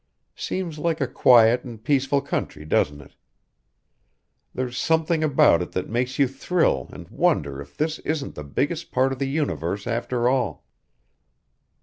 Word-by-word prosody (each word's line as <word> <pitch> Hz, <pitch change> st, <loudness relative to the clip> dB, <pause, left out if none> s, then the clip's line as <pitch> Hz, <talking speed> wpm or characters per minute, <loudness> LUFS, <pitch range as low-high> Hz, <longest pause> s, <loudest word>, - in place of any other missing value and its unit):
Seems 170 Hz, -5 st, -4 dB
like 165 Hz, 0 st, 0 dB
a 140 Hz, -, +1 dB
quiet 120 Hz, -1 st, +5 dB
and 115 Hz, -4 st, -10 dB
peaceful 140 Hz, +1 st, +2 dB
country, 75 Hz, -, -4 dB
doesn't 75 Hz, -1 st, 0 dB
it? 70 Hz, -, -17 dB, 1.4 s
There's 125 Hz, -1 st, -4 dB
something 160 Hz, +2 st, +1 dB
about 135 Hz, -, +4 dB
it 90 Hz, -, -6 dB
that 90 Hz, +3 st, -3 dB
makes 125 Hz, +3 st, -1 dB
you 140 Hz, -, +4 dB
thrill 135 Hz, -, 0 dB
and -, -, -10 dB
wonder 70 Hz, 0 st, 0 dB
if 70 Hz, 0 st, -13 dB
this 155 Hz, +1 st, -1 dB
isn't 150 Hz, -2 st, -3 dB
the 75 Hz, -, -7 dB
biggest 145 Hz, -, -2 dB
part 130 Hz, +1 st, +2 dB
of 130 Hz, -, -8 dB
the 135 Hz, -, -1 dB
universe 100 Hz, -, -2 dB
after 120 Hz, +1 st, -1 dB
all. 130 Hz, -, 0 dB
130 Hz, 150 wpm, -24 LUFS, 110-150 Hz, 1.4 s, quiet